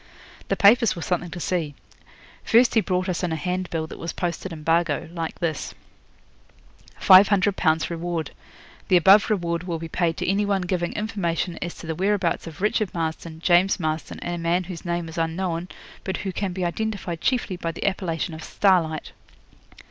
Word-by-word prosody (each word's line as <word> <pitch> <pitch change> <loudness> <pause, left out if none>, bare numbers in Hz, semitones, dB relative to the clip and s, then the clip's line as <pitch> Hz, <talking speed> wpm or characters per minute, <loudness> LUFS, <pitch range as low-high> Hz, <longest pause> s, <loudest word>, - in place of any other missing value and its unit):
The - - +1
papers 225 +2 +5
were 170 - -5
something 175 +1 -1
to 175 - -7
see. 165 -5 -2 0.7
First 240 +2 +4
he 225 - +4
brought 185 -2 -1
us 180 -2 -1
in 180 -2 -1
a - - 0
handbill 180 -1 -2
that - - -10
was 165 - -4
posted 175 +1 -3
in 155 -2 -8
Bargo, 165 -1 +1
like 165 -2 -4
this: 160 -4 -3 1.2
FIVE 190 +1 +8
HUNDRED 200 -1 +2
POUNDS 160 -2 +1
REWARD. 170 -2 -3 0.6
The 185 - +5
above 195 +5 +6
reward 170 -5 0
will 170 -2 -2
be 165 +1 -6
paid 165 0 0
to - - -2
any 195 +3 +2
one 200 -2 0
giving 175 -1 -1
information 185 -5 -2
as 175 - -4
to - - -10
the 160 - -2
whereabouts 190 0 0
of 160 +1 -10
Richard 210 -1 +1
Marston, 160 0 -4
James 180 +3 +3
Marston, 155 -1 -3
and 175 - -3
a 175 - -4
man 170 +2 +1
whose 175 -2 -8
name 170 -1 -2
is 160 +1 -6
unknown, 165 +1 -2 0.4
but 190 - -3
who 190 - -1
can 195 +1 -2
be 180 0 -2
identified 180 -3 -3
chiefly 240 -5 0
by 170 -2 -3
the - - -6
appellation 175 -4 -1
of 160 0 -8
Starlight. 170 -6 +1
175 Hz, 185 wpm, -24 LUFS, 165-190 Hz, 1.2 s, FIVE